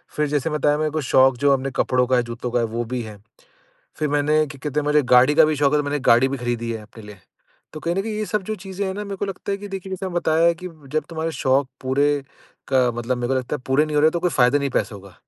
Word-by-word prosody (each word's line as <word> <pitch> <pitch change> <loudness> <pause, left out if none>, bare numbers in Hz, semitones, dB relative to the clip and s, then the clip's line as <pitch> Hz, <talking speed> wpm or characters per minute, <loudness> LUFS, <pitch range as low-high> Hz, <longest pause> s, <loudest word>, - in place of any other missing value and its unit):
फिर 150 0 +1
जैसे 145 +1 -1
मैं 150 -1 -2
बताया 150 +1 +2
मेरे 155 0 -1
को 155 +1 -2
शौक 130 -1 +5
जो 140 +2 +3
अपने 135 0 -1
कपड़ों 125 0 +2
का 130 - +2
है, 125 - +2
जूतों 120 +1 -6
का 120 - +1
है 115 - +1
वो 115 +1 -3
भी 125 +2 -3
है। 105 -2 -9 0.8
फिर 150 - -1
मैंने 145 +1 +2
क्या 140 -1 -11
कहते 150 0 -1
हैं - - -5
मुझे 150 0 +3
गाड़ी 130 +4 +6
का 160 +1 +7
भी 155 0 +1
शौक 140 0 +2
है 150 - +3
तो 150 - -1
मैंने 145 +1 -1
गाड़ी 120 +3 +5
भी 140 - -3
खरीदी 120 -1 -3
है 110 -1 -6
अपने 110 +1 -14
लिए। 105 -1 -12 0.5
तो 155 - -8
कहीं 170 +2 -1
न 195 - +1
कहीं 220 +1 -4
ये 215 0 -2
सब 210 -1 -1
जो 215 - -3
चीज़ें 195 +1 -4
है 190 - -2
न - - -7
मेरे 200 -1 -5
को 200 - -2
लगता 195 +1 -5
है 200 - -2
कि 205 0 -8
देखिए 195 -1 -7
जैसे 190 0 -4
मैंने 185 - -6
बताया 160 -1 +2
है 170 - +4
कि 180 +2 -8 0.2
जब 155 - 0
तुम्हारे 165 0 -3
शौक 135 -2 +1
पूरे 135 +2 +1 0.6
का 130 -2 +3
मतलब 120 +2 -2
मेरे 120 0 -2
को 135 - +1
लगता 130 +3 -3
है 130 - -15
पूरे 135 +3 +3
नहीं 150 -1 -3
हो - - +4
रहे 155 - +6
तो 170 - -3
कोई 180 0 +1
फ़ायदा 125 0 +3
नहीं 140 -1 -1
है - - -11
पैसों 105 -4 -5
का। 100 -2 -15
145 Hz, 310 wpm, -22 LUFS, 125-160 Hz, 0.8 s, का